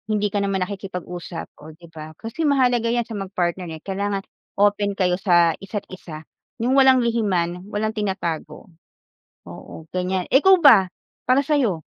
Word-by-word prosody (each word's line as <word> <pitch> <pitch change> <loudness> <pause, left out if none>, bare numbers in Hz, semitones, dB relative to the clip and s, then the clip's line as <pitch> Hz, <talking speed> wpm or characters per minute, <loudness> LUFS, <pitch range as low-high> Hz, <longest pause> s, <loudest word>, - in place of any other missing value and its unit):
Hindi 210 -1 0
ka 205 - 0
naman 195 -2 0
nakikipag-usap, 180 -3 -7
oh, 155 - -11
'di 170 0 -15
ba? 155 0 -9
Kasi 230 +8 -7
mahalaga 250 -4 +2
'yan 240 0 0
sa 225 - -9
mag-partner, 185 -3 -3
eh, 160 -1 -8
kailangan 200 0 -2 0.3
open 205 0 +1
kayo 180 -2 +2
sa 175 -4 +4
isa't 195 +1 -5
isa, 160 -4 -10 0.3
yung 245 +3 0
walang 265 -1 +5
lihiman, 185 -7 0
walang 215 +1 -2
tinatago. 190 -7 -4 0.8
Oo, 160 - -11
ganyan. 185 0 -1
Eh, 270 - +5
ikaw 380 0 +7
ba, 195 - +6 0.3
para 255 +2 +3
sa 300 +1 +1
'yo? 200 - 0
195 Hz, 160 wpm, -22 LUFS, 180-225 Hz, 0.8 s, ikaw